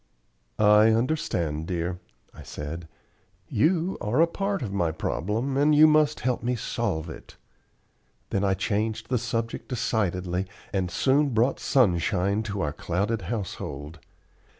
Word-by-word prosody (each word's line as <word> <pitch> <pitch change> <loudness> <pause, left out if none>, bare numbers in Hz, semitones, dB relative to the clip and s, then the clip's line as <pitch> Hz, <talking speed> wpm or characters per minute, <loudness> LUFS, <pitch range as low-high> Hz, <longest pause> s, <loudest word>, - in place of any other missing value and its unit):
"I 105 +1 +6
understand, 90 - -1
dear," 90 0 -2 0.3
I - - -12
said. 80 +3 -7 0.6
"You 175 +3 +1
are 110 +7 0
a 165 - +7
part 195 0 -2
of 100 -4 -4
my 85 -5 +1
problem, 105 - -2
and 150 +2 +4
you 155 +1 +8
must 155 -1 +3
help 125 -1 0
me 125 +1 0
solve 80 -7 -2
it." 80 - -10 1.0
Then 100 - 0
I 95 -1 +2
changed 110 +3 -2
the 125 -2 +1
subject 115 -1 -3
decidedly, 95 -6 -1 0.3
and 95 -2 0
soon 135 +6 +2
brought 120 +5 +2
sunshine 100 -3 +2
to 100 -1 -2
our 75 -4 -1
clouded 100 +8 -1
household. 85 - -5
105 Hz, 135 wpm, -26 LUFS, 90-130 Hz, 1.0 s, you